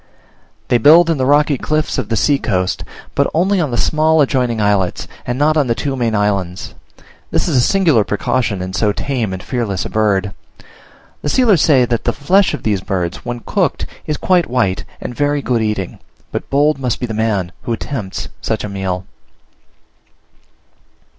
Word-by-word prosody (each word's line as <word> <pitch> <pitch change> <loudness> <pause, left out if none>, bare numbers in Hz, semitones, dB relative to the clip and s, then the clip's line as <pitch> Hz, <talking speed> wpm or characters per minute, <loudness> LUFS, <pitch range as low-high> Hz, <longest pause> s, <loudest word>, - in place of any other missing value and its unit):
They 120 - +3
build 165 +7 +6
in 155 - -1
the 130 - +1
rocky 145 -1 +3
cliffs 155 -2 -1
of 115 -5 -4
the 115 - 0
sea 140 +6 +2
coast, 90 -1 -1 0.3
but 140 - +1
only 190 +3 +2
on 155 - -1
the 120 - -2
small 155 +3 +2
adjoining 125 -5 +1
islets, 100 -3 0 0.2
and 125 0 -1
not 155 +2 +2
on 145 -4 +2
the 115 - +1
two 140 +1 -2
main 115 -4 0
islands: 100 -3 -1 0.6
this - - 0
is - - 0
a 125 - +5
singular 160 - +3
precaution 110 -2 -1
in 95 0 -6
so 105 +1 +1
tame 120 -6 -2
and 95 -1 -6
fearless 115 -7 -2
a - - -6
bird. 100 -2 +1 0.9
The 150 - -2
sealers 215 - +4
say 135 -5 +4
that 120 -1 -2
the - - +1
flesh 185 +7 +2
of - - -11
these 105 -3 0
birds, 90 -3 -2
when 120 0 -5
cooked, - - -1 0.2
is 150 - -1
quite 180 -6 +2
white, 115 -7 0
and - - -6
very 145 +2 0
good 120 -3 0
eating; 105 -4 -2 0.3
but - - -5
bold 145 +1 +2
must 125 -3 -1
the 120 -3 -3
man 110 -4 0
be 85 - -15
who 120 - -1
attempts 115 -5 -5
such - - -2
a 105 - -4
meal. 95 -2 -3
120 Hz, 185 wpm, -17 LUFS, 105-145 Hz, 0.9 s, build